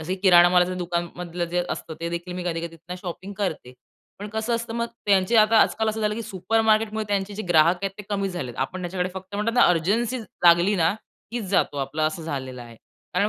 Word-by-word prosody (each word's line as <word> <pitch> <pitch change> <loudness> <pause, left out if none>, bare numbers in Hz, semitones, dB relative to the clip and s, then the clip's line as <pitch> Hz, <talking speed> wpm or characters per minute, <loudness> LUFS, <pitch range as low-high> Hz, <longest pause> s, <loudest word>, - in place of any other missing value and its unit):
असे 170 +4 -3
किराणामालाच्या 180 -1 +5
दुकानामधलं 175 0 -3
जे 175 +1 -1
असतं, 160 - -5
ते 170 - -2
देखील 170 +1 -5
मी 180 -1 -5
कधी-कधी 170 +1 -5
शॉपिंग 185 +2 -6
करते. 160 -10 -3 0.5
पण 205 - -5
कसं 220 +2 -2
असतं 230 0 -4
मग 235 0 -1 0.2
त्यांचे 195 +2 +3
आता 215 +1 +5
आजकाल 220 0 0
असं 220 +1 -2
झालं, 210 0 0
की 230 - -4
सुपरमार्केट 220 +2 +1
मुळे 220 0 -2
त्यांचे 200 0 -1
जे 215 - -4
ग्राहक 170 +1 +5
आहेत 195 - 0
ते - - -6
कमी 200 -1 0
झाले 175 -9 -5
आहे. 120 - -13
आपण 185 +7 -5
त्यांच्याकडे 180 +1 -2
फक्त 190 +1 -8
म्हणतात 210 +3 0
ना 245 - +5
अर्जन्सी 215 +9 +1
लागली 180 -3 +3
ना 165 -2 +3 0.4
कीच 240 -3 -3
जातो 180 -6 +1
आपला 140 +3 -2
असं 155 +1 -4
झालेलं 130 -5 -5
आहे. 115 -1 -13 0.4
कारण 200 +3 +2
185 Hz, 210 wpm, -24 LUFS, 170-210 Hz, 0.5 s, किराणामालाच्या